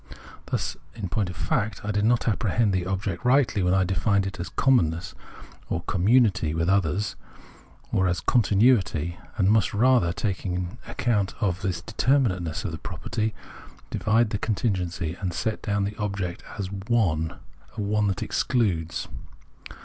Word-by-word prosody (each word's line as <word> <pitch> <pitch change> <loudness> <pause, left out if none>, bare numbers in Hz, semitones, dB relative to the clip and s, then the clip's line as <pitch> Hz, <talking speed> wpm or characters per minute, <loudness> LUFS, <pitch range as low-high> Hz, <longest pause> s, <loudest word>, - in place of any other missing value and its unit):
Thus, 75 - -2 0.2
in 105 -5 -4
point 95 0 0
of 90 - -7
fact, 105 +3 -1
I 105 - -1
did 105 0 +1
not 120 +1 +2
apprehend 110 -1 +1
the 90 -1 0
object 95 0 -2
rightly 125 -4 +3
when 90 +1 +2
I 95 - +4
defined 100 +2 +1
it 95 -1 -5
as 85 - -3
a - - -12
" - - -30
commonness 85 - +2 0.3
" - - -20
or 85 - -2
commimity 95 -5 +3
with 85 +1 0
others, 100 +1 +1 0.8
or 95 -1 +2
as 90 0 0
con 125 - +3
tinuity; 95 - +2 0.2
and 100 -2 +4
must 110 -1 +2
rather, 120 -6 +4
taking 90 +1 -3
account 105 -6 0
of 95 -1 0
the 100 - -1 0.2
deter 130 +5 +2
minateness 90 - -1
of - - -2
the - - -6
proj^erty, 110 0 -3 0.6
divide 110 +1 +2
the 105 - -1
continuity 90 -7 -1
and 90 -3 -2
set 110 +4 -2
down 100 -1 0
the 100 +2 -3
object 100 -4 -3
as 100 - -2
a - - -11
" 100 0 -7
one 80 -9 +1 0.3
" - - -24 0.3
that 95 - -1
excludes. 85 -10 0
100 Hz, 170 wpm, -25 LUFS, 90-110 Hz, 0.8 s, I